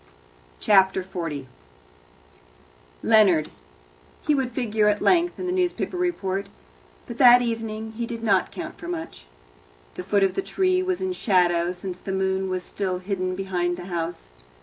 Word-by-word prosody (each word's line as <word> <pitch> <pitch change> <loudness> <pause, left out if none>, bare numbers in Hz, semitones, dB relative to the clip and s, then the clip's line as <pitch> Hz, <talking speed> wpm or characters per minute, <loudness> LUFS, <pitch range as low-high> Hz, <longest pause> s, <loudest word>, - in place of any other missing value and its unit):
Chapter 190 -2 +4
40 165 -7 -5 1.6
Leonard 200 -9 +4 0.7
he 300 - +3
would 265 -3 0
figure 220 -3 0
at 210 0 +2
length 350 -1 +2
in 365 - -3
a - - -1
newspaper 365 0 -1
report, 200 - -2 0.6
but - - -9
that 245 0 +8
evening 225 -1 -4
he 230 +1 -4
did 230 -1 -6
not 195 -4 +2
count 320 -2 -7
for 335 - -8
much. 325 - -6 0.7
The - - -6
foot 200 +1 +2
of 195 - +2
the - - -1
tree 370 -1 +1
was 370 -1 -2
in 375 -1 -1
shadow, 175 - +2
since 180 0 -7
the 190 - -5
moon 190 0 0
was 185 -1 -2
still 190 -3 -3
hidden 185 -1 -3
behind 180 -2 -2
the 180 - -8
house. 165 - -4
200 Hz, 155 wpm, -24 LUFS, 185-255 Hz, 1.6 s, that